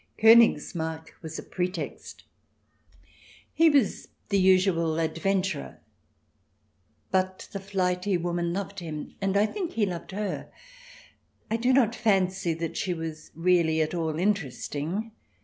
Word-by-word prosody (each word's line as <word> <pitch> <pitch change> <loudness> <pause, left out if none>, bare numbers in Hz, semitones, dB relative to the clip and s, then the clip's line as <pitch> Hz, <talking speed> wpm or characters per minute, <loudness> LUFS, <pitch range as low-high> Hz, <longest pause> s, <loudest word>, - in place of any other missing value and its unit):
Konigsmarck 160 -8 +4
was 160 -2 -7
a - - -6
pretext; 180 +1 -5 1.3
he 330 0 +5
was 280 -9 +2 0.2
the 200 -1 +2
usual 185 -4 +3
adventurer, 165 +1 -1 1.3
but 185 0 0
the 200 - -4
flighty 185 -1 0
woman 170 0 -1
loved 200 +2 -4
him, 155 -3 -6
and 195 0 +1
I 205 - +4
think 355 - -4
he 220 -2 +2
loved 175 -3 -5
her. 205 +1 -4 1.0
I 225 - +2
do 245 +3 +2
not 250 -4 +4
fancy 190 -6 +1
that 165 0 -4
she 180 -3 -1
was 160 -2 -6
really 165 -1 +3
at 155 +1 0
all 160 -3 -1
interesting. 180 - -2
185 Hz, 125 wpm, -27 LUFS, 165-200 Hz, 1.3 s, he